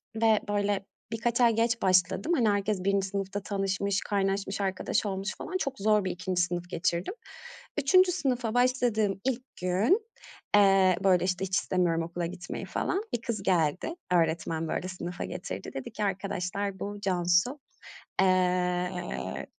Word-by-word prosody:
ve 220 -1 +4
böyle 205 -1 0 0.3
birkaç 235 +2 0
ay 235 -2 +5
geç 230 +1 +1
başladım. 185 - +2
Hani, 235 -7 +3
herkes 205 -1 0
1. 200 0 +1
sınıfta 195 0 -3
tanışmış, 195 0 -1
kaynaşmış, 195 0 -1
arkadaş 190 +2 0
olmuş 195 0 -3
falan. 370 - -3
Çok 275 - -3
zor 210 0 +3
bir 185 - 0
2. 180 0 -1
sınıf 175 0 -2
geçirdim. 175 - -1 0.6
3. 360 +6 +5
sınıfa 250 -10 -1
başladığım 240 -5 +2
ilk 260 -1 -1 0.2
gün, 215 - +2 0.5
eee, 195 -3 +5
böyle, 185 -2 +4
işte, 185 +1 0
hiç 185 -1 -2
istemiyorum 175 -3 +1
okula 170 +1 -3
gitmeyi 175 +1 -6
falan, 380 - -1
bir 235 - -1
kız 230 -4 -3
geldi. 180 - +1 0.2
Öğretmen, 165 -1 +1
böyle, 175 - -2
sınıfa 180 -1 -5
getirdi. 95 - -6
Dedi 135 - -6
ki: 210 - -4
"Arkadaşlar, 195 0 -2
bu 205 0 -5
Cansu. 180 +8 +2 0.6
Eee, 180 - 0
195 Hz, 145 wpm, -28 LUFS, 180-215 Hz, 0.6 s, ay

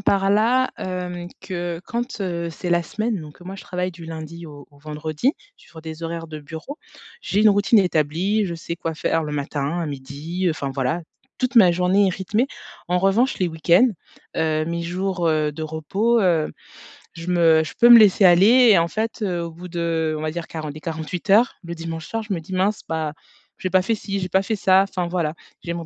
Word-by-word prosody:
par 195 0 +2
là, 240 +5 +3
hem, 180 -1 -5
que 175 -2 -4
quand, 240 -1 -4
heu, 170 -3 -2
c'est 175 +2 -5
la 175 0 +3
semaine, 215 +3 -2
donc 150 +3 -12
moi, 185 +2 -7
je 195 - -10
travaille 180 0 -3
du 170 -1 -12
lundi 165 +1 -8
au 145 -1 -12
au 145 - -21
vendredi 155 - -2 0.2
sur 160 - -14
des 160 0 -8
horaires 165 0 -4
de 155 -1 -8
bureau. 160 - -8 0.4
J'ai 205 - 0
une 215 - +6
routine 205 +3 +4
établie, 180 +4 +1
je 170 - -4
sais 170 +1 -6
quoi 165 -1 -4
faire 165 +1 0
le 150 -1 -5
matin, 145 +2 -2
à 165 - -2
midi, 145 +6 -5
heu, - - +2
enfin 140 -3 -3
voilà. 135 +5 -1 0.4
Toute 255 0 -1
ma 185 -6 +7
journée 180 +3 +3
est - - +2
rythmée. 210 +6 0 0.4
En 180 +1 +1
revanche, 215 +7 +2
les 180 -2 +1
week-ends, 170 +8 +4 0.5
heu, 155 -1 +1
mes 170 0 -3
jours, 180 +1 -2
heu, 155 -1 +1
de 160 - -7
repos, 195 +10 0
heu, 170 -5 +2 0.6
je 165 +1 -9
me 165 -3 +4
je 155 - -7
peux 240 - +7
me 240 -1 +11
laisser 205 -2 +5
aller 215 +8 +7
et 200 - +6
en 165 - +1
fait, 220 +4 -3
heu, 180 -4 -1
au 170 - -6
bout 175 +3 -10
de 165 -2 -1
on - - -5
va 155 0 -2
dire 170 0 -5
quarante 155 -3 -6
quarante-huit 165 +4 -5
heures, 225 +6 +5
le 170 0 -6
dimanche 165 -1 -6
soir, 225 - -3
je 210 -2 -3
me 170 - -2
dis: 185 - -9
«Mince, 195 +3 +1
bah, 160 -2 -2 0.5
j'ai 185 - -2
pas 185 0 +4
fait 225 +4 0
ci, 200 -1 -4
j'ai 180 - -3
pas 190 +2 +2
fait 220 +2 -2
ça» 190 -1 +5
enfin 180 -3 -2
voilà. 170 -3 -2 0.3
J'aimerais 170 -1 -4
175 Hz, 215 wpm, -22 LUFS, 160-195 Hz, 0.6 s, me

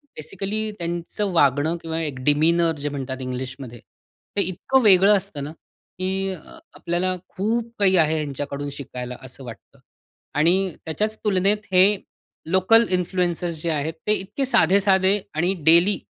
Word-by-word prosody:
Basically 195 +7 -3
त्यांचं 175 +4 -3
वागणं 145 +1 +2
किंवा 160 0 -4
एक 145 -5 -4
डिमीनर 165 +3 +3
जे 145 +1 -3
म्हणतात 135 -2 -5
इंग्लिशमध्ये. 130 -1 -6 0.6
ते - - +5
इतकं 195 +9 +1
वेगळं 200 0 +6
असतं 150 -6 -6
ना, 145 - -6
की 190 +4 -5
अ, 180 - -9 0.4
आपल्याला 185 +2 -2
खूप 230 +4 -2
काही 190 -2 +4
आहे 160 -1 +3
ह्यांच्याकडून 145 -1 -4
शिकायला 125 -2 -7
असं 130 +1 -10
वाटतं 115 -2 -12 0.6
आणि 180 +3 +2
त्याच्याच 215 +7 -2
तुलनेत 200 +1 +1
हे 185 0 +7 0.7
लोकल 220 +5 +4
इन्फ्लुएंसर्स 180 -2 -1
जे 170 - -1
आहेत, 155 +1 -2
ते 210 - +4
इतके 210 +7 -2
साधे-साधे 190 -2 +3 0.2
आणि 175 +4 +1
डेली 170 +4 +5
175 Hz, 140 wpm, -22 LUFS, 150-195 Hz, 0.7 s, हे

